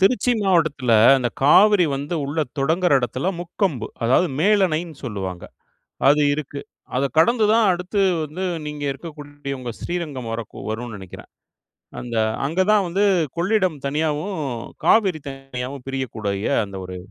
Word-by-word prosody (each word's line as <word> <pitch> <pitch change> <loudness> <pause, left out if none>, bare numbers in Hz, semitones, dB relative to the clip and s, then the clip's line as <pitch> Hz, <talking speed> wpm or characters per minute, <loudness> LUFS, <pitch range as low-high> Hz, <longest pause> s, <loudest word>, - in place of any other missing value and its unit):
திருச்சி 245 +6 +3
மாவட்டத்தில, 155 - +2 0.3
அந்த 125 -2 0
காவிரி 200 +6 +6
வந்து 145 +5 -4
உள்ள 145 +3 -4 0.2
தொடங்குற 165 +5 +2
இடத்துல 130 +7 -2
முக்கொம்பு. 175 - -2 0.2
அதாவது, 130 +9 +3
மேலணைன்னு 175 -5 +2
சொல்லுவாங்க, 95 -6 -5 0.6
அது 150 +1 +5
இருக்கு. 145 -1 -5 0.4
அத 135 - +1
கடந்துதான் 220 +4 +4
அடுத்து 180 +3 -2 0.2
வந்து 155 +5 -5 0.2
நீங்க 150 -1 -5
இருக்கக்கூடிய 145 -2 -8
உங்க 125 -2 -5
ஸ்ரீரங்கம் 150 -9 -4
வரக்கு 115 -1 -7
வரும்னு 115 0 -5
நெனைக்கிறேன். 95 -2 -11 0.7
அந்த, 120 -1 -5 0.3
அங்க 165 +6 -1
தான் 205 -3 +3
வந்து 195 +4 +1 0.3
கொள்ளிடம் 185 -3 +1
தனியாவும், 155 +6 -1 0.5
காவிரி 190 -8 +4
தனியாவும் 135 -1 -7
பிரியக்கூடிய 110 -7 -3 0.2
அந்த 100 -1 -9
ஒரு 90 0 -7
150 Hz, 125 wpm, -22 LUFS, 130-180 Hz, 0.7 s, காவிரி